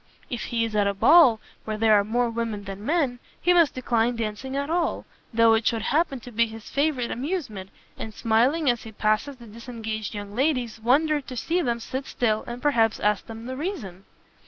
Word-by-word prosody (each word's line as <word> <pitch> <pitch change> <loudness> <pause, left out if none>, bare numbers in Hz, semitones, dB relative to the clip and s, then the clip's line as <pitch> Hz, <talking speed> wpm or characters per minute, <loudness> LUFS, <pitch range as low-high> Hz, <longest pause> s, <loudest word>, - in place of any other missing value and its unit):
If 240 - -3
he 230 -1 0
is 220 -1 -5
at 205 -1 +3
a 200 - -1
ball 275 - +6 0.2
where 215 -1 -4
there 220 0 +4
are 205 -1 +5
more 240 +4 0
women 225 -3 -3
than 195 0 -8
men, 280 -3 0 0.2
he 355 - +3
must 340 -4 +4
decline 240 -2 +1
dancing 230 +4 -4
at 280 0 -1
all, 335 +1 -1 0.3
though 230 -1 +5
it 225 0 +1
should 225 -2 0
happen 295 -3 +1
to 245 - -10
be 235 +1 +2
his 225 -1 -11
favourite 280 -4 0
amusement, 250 - -4 0.3
and 220 - -5
smiling 240 +8 +1
as 240 -2 +2
he 225 - -10
passes 215 +6 0
the 240 -2 -14
disengaged 220 -1 -6
young 205 0 -7
ladies, 250 -3 0
wonder 290 +6 +2
to 255 -2 -9
see 340 +9 0
them 235 -6 -1
sit 260 +4 -5
still, 220 -3 0
and 240 +2 -7
perhaps 230 -7 +2
ask 210 -1 0
them 225 0 -8
the 260 +1 -5
reason!" 240 - -5
235 Hz, 205 wpm, -25 LUFS, 220-275 Hz, 0.3 s, ball